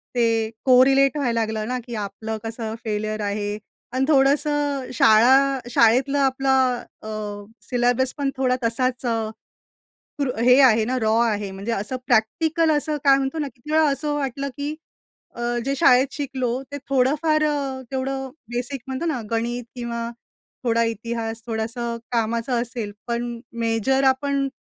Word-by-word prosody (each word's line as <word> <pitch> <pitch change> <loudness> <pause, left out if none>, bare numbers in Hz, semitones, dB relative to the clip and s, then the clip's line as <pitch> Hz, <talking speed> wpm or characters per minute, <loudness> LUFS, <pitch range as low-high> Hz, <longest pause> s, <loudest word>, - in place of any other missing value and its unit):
ते 225 -2 +2 0.2
कोरिलेट 270 +2 +5
व्हायला 240 -5 0
लागलं 220 -1 -2
ना, 250 0 -2
की 240 - -5
आपलं 220 +1 -4
कसं 225 -1 -4
फेल्युर 215 0 -2
आहे? 205 0 -2 0.3
आणि 260 +1 +1
थोडंसं 285 -1 +2
शाळा 260 +5 +5
शाळेतलं 245 +4 +3
आपलं 265 -2 +2 0.2
अ, - - -8 0.6
सिलेबस 245 +1 +1
पण 280 -1 0
थोडा 255 -1 +2
तसाच 250 +2 -1
अ, 225 -2 0 1.0
र 255 - -1
हे 250 +2 +6
आहे 225 -4 +5
ना, 255 +3 -1
रॉ 220 0 +2
आहे. 210 -4 0
म्हणजे 195 +4 -4
असं 210 +4 -3
प्रॅक्टिकल 315 +8 +2
असं 300 0 0
काय 275 -1 +7
म्हणतो 270 +4 -2
ना, 290 -2 -2
किती 250 +5 -12
वेळा 315 0 +5
असं 295 +1 -2
वाटलं 275 -1 -2
की 290 +2 -3 0.6
अ, 240 - -5 0.2
जे 275 +1 0
शाळेत 255 +1 +5
शिकलो. 260 -3 -2
ते 285 - -4
थोडंफार 300 +4 +2
अ, 280 -3 -1
तेवढं 265 0 -3 0.3
बेसिक 250 +2 -3
म्हणतो 265 +6 -3
ना, 295 -7 -1
गणित 235 +2 -1
किंवा 235 -1 -4 0.5
थोडा 230 -1 +2
इतिहास. 225 0 -5
थोडंसं 235 +1 -3 0.2
कामाचं 235 +1 0
असेल. 230 -4 -5
पण 235 0 -3 0.2
मेजर 230 +4 +1
आपण 275 +1 +1
250 Hz, 145 wpm, -23 LUFS, 230-275 Hz, 1.0 s, काय